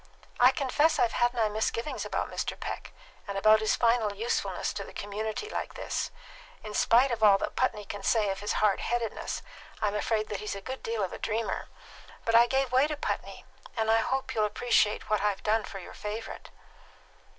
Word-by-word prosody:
"I 250 Hz, -, +8 dB
confess 295 Hz, +3 st, +2 dB
I've 230 Hz, -, +3 dB
had 240 Hz, 0 st, +2 dB
my 225 Hz, -2 st, +2 dB
misgivings 220 Hz, +5 st, -2 dB
about -, -, -2 dB
Mr. -, -, -3 dB
Peck, -, -, -5 dB, 0.4 s
and 200 Hz, -1 st, -3 dB
about 215 Hz, +2 st, +6 dB
his 220 Hz, 0 st, +2 dB
final 230 Hz, -3 st, +2 dB
usefulness 230 Hz, +4 st, -1 dB
in -, -, -6 dB
a -, -, -13 dB
community 215 Hz, -, -4 dB
like -, -, -4 dB
this. -, -, -2 dB, 0.5 s
In 215 Hz, -1 st, -7 dB
spite 245 Hz, +5 st, +4 dB
of 230 Hz, -2 st, -2 dB
all 205 Hz, -2 st, +7 dB
that -, -, -4 dB
Putney 210 Hz, -5 st, 0 dB
can 205 Hz, -, -6 dB
say 210 Hz, 0 st, +2 dB
of 195 Hz, -, -4 dB
his 205 Hz, -, -2 dB
hard 210 Hz, -2 st, +2 dB
headedness, 235 Hz, -2 st, -2 dB, 0.4 s
I'm 210 Hz, -1 st, 0 dB
afraid 215 Hz, +1 st, 0 dB
that 205 Hz, -, -3 dB
he's 210 Hz, -1 st, -4 dB
a -, -, -5 dB
good 260 Hz, +7 st, -6 dB
deal 225 Hz, -2 st, -2 dB
of 185 Hz, -, -3 dB
a -, -, -7 dB
dreamer. 225 Hz, +1 st, -2 dB, 0.6 s
But 230 Hz, -, +1 dB
I 235 Hz, +1 st, +7 dB
gave 265 Hz, 0 st, +1 dB
way 260 Hz, +3 st, +4 dB
to 300 Hz, -1 st, -4 dB
Putney, -, -, -4 dB, 0.3 s
and 220 Hz, 0 st, +2 dB
I 225 Hz, -, +5 dB
hope 260 Hz, +3 st, -1 dB
you'll 215 Hz, -3 st, +2 dB
appreciate 215 Hz, -1 st, +1 dB
what 215 Hz, -2 st, +1 dB
I've 205 Hz, -1 st, 0 dB
done 220 Hz, 0 st, +2 dB
for 195 Hz, -, -8 dB
your 185 Hz, -, -9 dB
favourite." 215 Hz, +2 st, -6 dB
220 Hz, 200 wpm, -29 LUFS, 210-240 Hz, 0.6 s, I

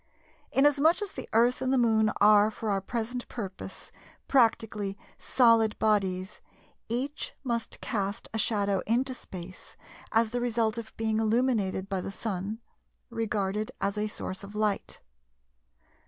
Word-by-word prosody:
Inasmuch 290 Hz, +4 st, +4 dB
as 405 Hz, -, -5 dB
the -, -, -8 dB
Earth 240 Hz, +3 st, +3 dB
and 260 Hz, 0 st, 0 dB
the 265 Hz, -, +3 dB
Moon 220 Hz, -3 st, +4 dB
are 210 Hz, 0 st, +6 dB
for 220 Hz, 0 st, -3 dB
our 195 Hz, -1 st, 0 dB
present 235 Hz, +4 st, -4 dB
purpose 195 Hz, -6 st, -7 dB, 0.4 s
practically 220 Hz, -5 st, +2 dB, 0.2 s
"solid 230 Hz, -4 st, +4 dB
bodies," 195 Hz, -2 st, 0 dB, 0.5 s
each 265 Hz, +6 st, -3 dB
must 235 Hz, -3 st, -3 dB
cast 200 Hz, 0 st, -2 dB
a 220 Hz, -, -1 dB
shadow 200 Hz, -3 st, +1 dB
into 255 Hz, +4 st, +1 dB
space 185 Hz, -6 st, -10 dB, 0.3 s
as 225 Hz, 0 st, +3 dB
the 245 Hz, 0 st, -1 dB
result 230 Hz, -2 st, +1 dB
of 220 Hz, -1 st, -8 dB
being 220 Hz, -1 st, 0 dB
illuminated 220 Hz, -4 st, +1 dB
by 195 Hz, -2 st, -2 dB
the -, -, -5 dB
Sun, 205 Hz, +1 st, -4 dB, 0.5 s
regarded 215 Hz, -2 st, -1 dB
as 200 Hz, +1 st, 0 dB
a 210 Hz, 0 st, -1 dB
source 190 Hz, -2 st, -5 dB
of 200 Hz, +1 st, -10 dB
light. 210 Hz, -1 st, -1 dB
220 Hz, 140 wpm, -28 LUFS, 200-235 Hz, 0.5 s, are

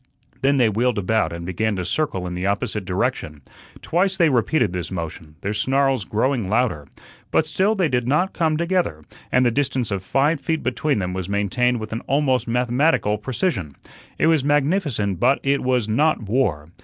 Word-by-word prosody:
Then 140 Hz, +1 st, +3 dB
they 125 Hz, -3 st, +4 dB
wheeled 115 Hz, +3 st, 0 dB
about 105 Hz, -3 st, +1 dB
and 85 Hz, 0 st, -6 dB
began 105 Hz, +4 st, -1 dB
to 90 Hz, -1 st, -3 dB
circle 95 Hz, -, -1 dB
in 90 Hz, -, -4 dB
the 90 Hz, +2 st, -2 dB
opposite 100 Hz, 0 st, -2 dB
direction. 80 Hz, -5 st, -2 dB, 0.4 s
Twice 190 Hz, +3 st, +1 dB
they 170 Hz, -4 st, +4 dB
repeated 125 Hz, -, +1 dB
this 90 Hz, -1 st, -3 dB
motion, 80 Hz, -3 st, -6 dB
their 100 Hz, +1 st, -2 dB
snarls 135 Hz, +1 st, +1 dB
growing 115 Hz, -1 st, 0 dB
louder. 110 Hz, -, 0 dB, 0.4 s
But 160 Hz, -, +2 dB
still 190 Hz, +7 st, +1 dB
they 185 Hz, -5 st, +2 dB
did 125 Hz, -3 st, -1 dB
not 175 Hz, +8 st, +1 dB
come 160 Hz, -2 st, +1 dB
together, 170 Hz, -, -1 dB, 0.3 s
and 125 Hz, 0 st, +3 dB
the 120 Hz, -, +3 dB
distance 130 Hz, -3 st, -1 dB
of 100 Hz, -2 st, -1 dB
five 145 Hz, +9 st, +1 dB
feet 160 Hz, +4 st, -2 dB
between 140 Hz, +3 st, 0 dB
them 90 Hz, -2 st, -2 dB
was 95 Hz, 0 st, -4 dB
maintained 120 Hz, +5 st, +1 dB
with 110 Hz, 0 st, -6 dB
an 115 Hz, -, -2 dB
almost 130 Hz, -4 st, +1 dB
mathematical 125 Hz, -2 st, +1 dB
precision. 110 Hz, -, -2 dB, 0.4 s
It -, -, +2 dB
was 160 Hz, -4 st, +3 dB
magnificent, 145 Hz, -, 0 dB
but 130 Hz, +3 st, +3 dB
it 140 Hz, 0 st, +1 dB
was 125 Hz, -4 st, +1 dB
not 130 Hz, +3 st, +1 dB
war. 100 Hz, -, -1 dB
125 Hz, 180 wpm, -22 LUFS, 100-145 Hz, 0.4 s, they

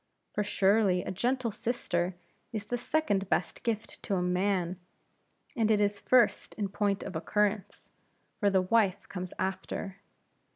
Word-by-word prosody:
For 210 Hz, -, 0 dB
surely 195 Hz, -2 st, +3 dB
a -, -, -4 dB
gentle 240 Hz, +5 st, 0 dB
sister 185 Hz, -6 st, -1 dB, 0.4 s
is 215 Hz, -2 st, -4 dB
the 245 Hz, -, -2 dB
second 210 Hz, -9 st, 0 dB
best -, -, 0 dB
gift 225 Hz, -2 st, -3 dB
to 200 Hz, -, -1 dB
a 180 Hz, -, +1 dB
man; 180 Hz, 0 st, 0 dB, 0.8 s
and 225 Hz, -4 st, +2 dB
it 215 Hz, -2 st, +4 dB
is 205 Hz, 0 st, +1 dB
first 245 Hz, +2 st, +3 dB
in 205 Hz, -2 st, -2 dB
point 205 Hz, 0 st, 0 dB
of 185 Hz, -, -6 dB
occurrence; 205 Hz, +4 st, -1 dB, 0.5 s
for 205 Hz, -, +4 dB
the 190 Hz, -1 st, +3 dB
wife 200 Hz, -1 st, +2 dB
comes 180 Hz, -2 st, -5 dB
after. 190 Hz, +1 st, -3 dB
200 Hz, 150 wpm, -30 LUFS, 190-220 Hz, 0.8 s, it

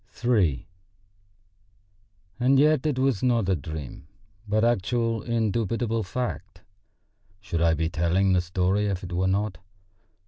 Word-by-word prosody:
III 100 Hz, -, +2 dB, 1.7 s
And 130 Hz, +2 st, +4 dB
yet 150 Hz, 0 st, +3 dB
it 145 Hz, -4 st, -1 dB
was 130 Hz, -5 st, +1 dB
not 120 Hz, -6 st, +1 dB
a 95 Hz, -, +3 dB
dream, 75 Hz, -2 st, -7 dB, 0.4 s
but 110 Hz, +1 st, +1 dB
actual, 115 Hz, 0 st, +1 dB
indubitable 115 Hz, 0 st, -1 dB
fact. 105 Hz, -3 st, -5 dB, 0.8 s
Should 90 Hz, -5 st, -3 dB
I 85 Hz, -1 st, +3 dB
be 80 Hz, +1 st, -1 dB
telling 85 Hz, +4 st, +1 dB
the 90 Hz, -, +3 dB
story 95 Hz, +4 st, 0 dB
if 95 Hz, -2 st, -3 dB
it 90 Hz, -1 st, -6 dB
were 95 Hz, +2 st, +1 dB
not? 100 Hz, -2 st, -1 dB
100 Hz, 130 wpm, -25 LUFS, 90-120 Hz, 1.7 s, And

